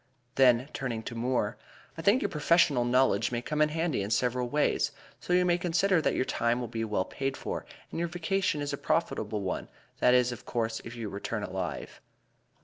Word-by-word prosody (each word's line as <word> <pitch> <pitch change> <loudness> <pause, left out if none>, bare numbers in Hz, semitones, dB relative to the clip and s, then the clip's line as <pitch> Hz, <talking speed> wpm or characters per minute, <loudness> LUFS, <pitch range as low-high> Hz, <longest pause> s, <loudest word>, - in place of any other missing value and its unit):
Then, 125 -1 +4
turning 120 -5 -3
to 120 - -6
Moore: 115 -2 -1 0.4
"I 165 - -6
think 205 +9 +4
your - - 0
professional 150 -5 +3
knowledge 120 -4 +3
may 120 - -1
come 150 +2 -1
in 150 - +4
handy 160 -5 -1
in 100 - -3
several 125 +3 0
ways, 150 +3 +1 0.3
so - - -6
you 180 0 +4
may 175 0 +2
consider 175 +1 +2
that - - +1
your - - +1
time 120 -1 0
will 120 - -3
be 115 0 -3
well 105 -4 0
paid 135 0 -3
for, - - -5 0.2
and - - -4
your 170 - 0
vacation 175 -2 0
a 145 - -3
profitable 105 -2 -1
one 95 -2 -3 0.3
that 125 0 +5
is, 125 0 +3
of 120 - -8
course, 115 -1 -2
if 120 +1 -8
you 115 -2 -4
return 100 +1 -4
alive." - - -5
125 Hz, 200 wpm, -29 LUFS, 115-160 Hz, 0.4 s, that